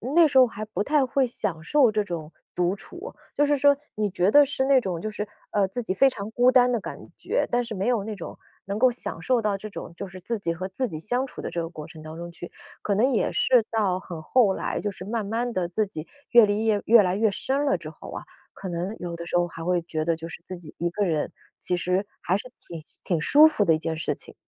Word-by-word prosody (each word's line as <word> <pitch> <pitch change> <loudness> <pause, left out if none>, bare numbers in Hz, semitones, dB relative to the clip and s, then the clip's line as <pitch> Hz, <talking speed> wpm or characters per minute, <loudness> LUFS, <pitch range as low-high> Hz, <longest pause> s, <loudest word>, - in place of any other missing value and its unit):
那 335 -2 +7
时 270 - +1
候 255 -1 +8
还 215 -1 -6
不 210 -1 -2
太 290 0 +2
会 265 +1 +2
享 165 -8 -3
受 265 - +4
这 210 -1 +1
种 165 -4 -6 0.2
独 180 +2 +1
处。 360 - -10 0.2
就 290 - +3
是 290 0 +2
说， 285 0 +5 0.2
你 210 -1 0
觉 190 +2 +1
得 290 0 +8
是 265 -1 -1
那 270 -2 +5
种 180 -5 -3
就 215 - -3
是， 210 0 -4 0.2
呃， 200 -2 +2
自 240 +5 -4
己 190 - -1
非 270 +7 +5
常 210 -3 -6
孤 245 +2 +4
单 250 -1 +5
的 235 - +1
感 - - -7 0.2
觉， - - -1
但 245 0 +2
是 225 -2 -6
没 195 +4 -1
有 235 -5 +1
那 215 0 -5
种， 170 - -8 0.3
能 200 +2 -3
够 255 0 +6
享 200 -8 -5
受 250 +5 +2
到 210 -2 0
这 215 +2 -8
种 170 - -8
就 195 - -6
是 185 0 -10
自 225 +4 -3
己 170 -4 -1
和 185 +3 -5
自 250 +7 -2
己 155 - -6
相 245 +8 -1
处 - - -9
的 - - -4
这 170 - -2
个 165 - -4
过 155 -3 -8
程 160 -1 -12
当 155 +1 -9
中 170 0 -7
去。 175 0 -9 0.3
可 200 - 0
能 250 +5 +3
也 - - +1
是 245 -4 +4
到 200 -5 +1
很 170 -4 -8
后 220 0 +3
来， - - -2
就 205 - -2
是 185 -1 -10
慢 220 0 -2
慢 235 +4 -2
地 180 -3 -1
自 210 +5 0
己 160 -5 -8 0.2
阅 235 -2 +8
历 205 +2 0
叶 210 -2 +2
越 225 -1 +7
来 180 0 0
越 220 +1 +3
深 275 +7 -1
了 280 - +2
之 - - -8
后 - - -11
啊， - - -6 0.3
可 195 - -8
能 180 +5 -3
有 175 -1 -5
的 170 - -7
时 175 - +1
候 175 - +2
还 165 -1 -8
会 180 0 +2
觉 155 -2 -3
得 165 +1 +1
就 165 +1 -7
是 170 - -10
自 185 -1 -7
己 160 -3 -10
一 175 0 0
个 205 +3 -1
人， 155 -4 -1 0.3
其 180 - 0
实 180 +3 0
还 185 - 0
是 250 +5 -5 0.2
挺 165 -2 -7 0.2
挺 170 -5 0
舒 295 - +7
服 300 -10 +1
的 165 -4 +4
一 - - -1
件 160 0 -3
事 155 - -2
情。 - - -6
205 Hz, 295 characters per minute, -25 LUFS, 175-245 Hz, 0.3 s, 候